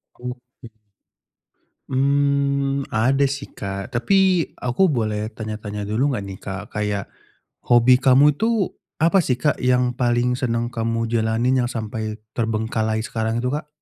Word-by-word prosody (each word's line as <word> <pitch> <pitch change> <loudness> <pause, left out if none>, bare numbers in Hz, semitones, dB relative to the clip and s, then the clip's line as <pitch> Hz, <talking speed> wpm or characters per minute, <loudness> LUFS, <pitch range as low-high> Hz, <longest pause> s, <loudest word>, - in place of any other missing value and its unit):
Oke. 125 0 -10 1.2
Mmm, 140 0 +1
ada 130 +5 +3
sih, 140 0 -3
Kak. 100 +2 -6
Tapi 185 +7 +3 0.2
aku 125 +10 +2
boleh 110 -8 0
tanya-tanya 105 -1 -5
dulu 130 +6 +1
enggak 100 - -3
nih, 95 - -7
Kak, 95 +1 -6
kayak 105 -1 -2 0.7
hobi 120 +1 +6
kamu 135 +2 +6
itu 225 -3 +1 0.2
apa 170 +4 +4
sih, 130 -7 0
Kak, 140 +3 0
yang 125 0 +2
paling 120 0 +1
senang 120 -1 -1
kamu 115 -1 -1
jalanin 115 +3 +2
yang 120 - 0
sampai 110 -2 -4 0.2
terbengkalai 110 -1 -1
sekarang 115 +1 -2
itu, 125 - 0
Kak? 150 0 -3
125 Hz, 135 wpm, -22 LUFS, 110-140 Hz, 1.2 s, hobi